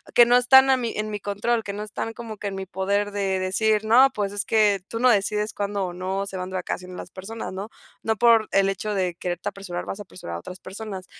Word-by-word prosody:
que 240 - +9
no 240 +1 +4
están 265 +2 +7
a 260 - +4
mí 235 -3 -2
en 215 0 -3
mi 210 - -3
control, 205 +4 -1
que 200 - -5
no 205 +1 -4
están 215 +1 -5
como 225 -2 -8
que 205 - -5
en 195 - -4
mi 195 0 -5
poder 200 +2 -1
de 195 -2 0
decir: 210 +3 +1
"No, 250 +5 +7
pues, 205 -2 -1
es 205 - -3
que 210 -3 +3
tú 230 - -5
no 250 +1 +5
decides 210 0 0
cuándo 200 -1 -2
o 180 - -5
no 190 +2 -2
se 195 -1 -6
van 180 0 -4
de 190 - -6
vacaciones 180 0 -4
as 175 - -9
personas", 205 +3 -7
¿no? 195 +3 -5 0.3
No 220 - 0
por 230 -1 +5
el 195 0 +3
hecho 205 +2 -3
de 185 -2 0
quererte 175 +2 -4
a - - 0
apresurar, 190 -3 -6
vas 195 - -5
a - - -6
apresurar 85 - -8
a - - -7
otras 180 - -10
personas. 195 -1 -7
205 Hz, 265 wpm, -24 LUFS, 190-220 Hz, 0.3 s, que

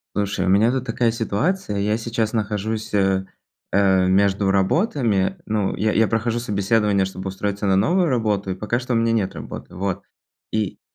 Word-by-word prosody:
Слушай, 100 -2 -1
у - - +1
меня 110 +5 +4
тут 130 -1 -2
такая 115 0 +1
ситуация. 115 - -1
Я 105 +2 +1
сейчас 115 -1 -2
нахожусь, 110 0 -2
э, 95 -1 +2 0.5
э, 95 -2 +3
между 95 +1 +2
работами. 110 - +1
Ну, 105 -3 -1
я 110 0 +1
я 110 +1 +3
прохожу 115 +2 0
собеседование, 105 -2 +1
чтобы 95 0 -6
устроиться 100 +1 -3
на 95 - +3
новую 175 - +2
работу, 110 -7 0
и - - -3
пока 110 +5 -1
что 130 0 -3
у - - +2
меня 115 0 +2
нет 110 -5 0
работы, - - -8
вот. 95 -1 -2 0.5
И 110 -3 -2
105 Hz, 175 wpm, -22 LUFS, 95-115 Hz, 0.5 s, меня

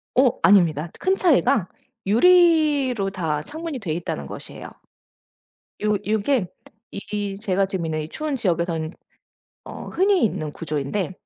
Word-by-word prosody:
어 255 -1 +5
아닙니다. 170 -5 +4
큰 380 +1 +2
차이가 275 - +3 0.4
유리로 290 - +4
다 160 -6 -2
창문이 315 - -6
되어 170 -7 -3
있다는 160 - -4
것이에요. - - -9 1.2
요 210 0 +2
요게 220 0 +1 0.4
이 205 0 -4
제가 195 -2 +1
지금 190 -3 -4
있는 155 -1 -2
이 155 - -7
추운 305 -2 -3
지역에서는 170 -6 -1 0.7
어 - - -8
흔히 385 - +2
있는 155 -8 -2
구조인데 155 +5 -3
205 Hz, 275 characters per minute, -23 LUFS, 170-275 Hz, 1.2 s, 어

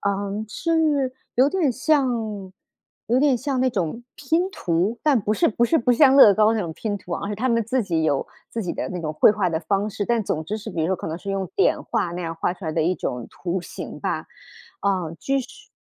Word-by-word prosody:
嗯， 200 +1 -1
是 305 -2 +1 0.2
有 260 +3 +5
点 320 -5 +1
像 235 -9 0 0.6
有 245 +2 +3
点 285 -3 +4
像 265 +1 -2
那 260 - +3
种 195 +3 -2
拼 330 +6 0
图， 190 - -1
但 285 -7 +3
不 210 +2 0
是 - - +3
不 235 - -1
是 325 - +3
不 245 -1 +2
像 270 +1 +6
乐 210 -7 +9
高 215 +3 +3
那 220 - 0
种 170 -4 -4
拼 205 +4 -3
图 180 -2 -9
啊， 200 - -3
是 210 - -2
他 250 +5 -1
们 230 -1 +2
自 250 +3 0
己 165 -5 -1
有 145 -3 +1 0.2
自 230 - -4
己 175 - -3
的 - - -4
那 180 - -5
种 155 -2 -3
绘 155 - +6
画 205 -4 0
的 160 0 -1
方 200 +5 0
式。 205 0 -3
但 235 -3 +1
总 155 - -2
之 210 +6 -3
是 215 - -7
比 165 - -3
如 160 - +1
说 190 +1 0
可 - - -7
能 160 +2 -4
是 200 - -6
用 195 -1 -2
点 395 - +3
画 170 - -1
那 180 - -4
样 165 -1 -4
画 175 +2 -1
出 185 - -12
来 160 - -2
的 160 0 +1
一 180 +3 +1
种 125 -7 -4
图 180 +1 -3
形 - - -8
吧， - - -2 0.5
啊， 185 -5 0
就 275 0 0
是 255 -1 -9
210 Hz, 260 characters per minute, -23 LUFS, 180-255 Hz, 0.6 s, 乐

